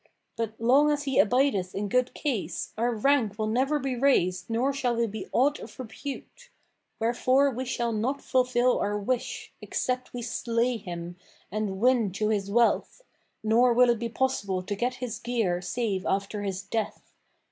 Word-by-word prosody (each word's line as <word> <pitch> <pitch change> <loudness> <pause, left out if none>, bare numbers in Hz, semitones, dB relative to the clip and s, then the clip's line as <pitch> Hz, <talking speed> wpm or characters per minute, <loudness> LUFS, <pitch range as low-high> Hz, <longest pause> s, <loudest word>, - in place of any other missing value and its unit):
But, 225 -1 -4
long 265 +6 +5
as 295 -1 0
he 270 -2 +1
abideth 215 -5 +2
in 205 +1 -2
good 250 +4 +1
case, 200 - -3
our 235 +2 +1
rank 225 -3 +2
will 215 - -1
never 260 +7 +1
be 270 -2 -2
raised 185 -9 +2
nor 245 +5 +1
shall 250 -3 0
we 235 0 +2
be 220 0 -6
aught 285 +4 +2
of - - -11
repute; 280 - -8 0.5
wherefore 255 +4 +3
we 255 +1 -4
shall 240 -2 -1
not 240 +6 -1
fulfil 255 -1 +2
our 205 0 0
wish, 235 +4 -3
except 255 0 -2
we 245 -1 -5
slay 235 +1 0
him 175 -3 -7 0.3
and 205 -2 -2
win 240 -3 +3
to 215 +2 0
his 200 -2 0
wealth, 235 - +1 0.4
nor 235 +3 +4
will 245 0 +5
it 235 - -1
be 235 0 -2
possible 215 -7 -1
to 205 +2 -3
get 245 +4 -1
his 245 -2 -5
gear 225 -8 0
save 195 0 -2
after 200 +2 -1
his 195 -2 -3
death. 210 +2 -4
235 Hz, 170 wpm, -27 LUFS, 205-255 Hz, 0.5 s, long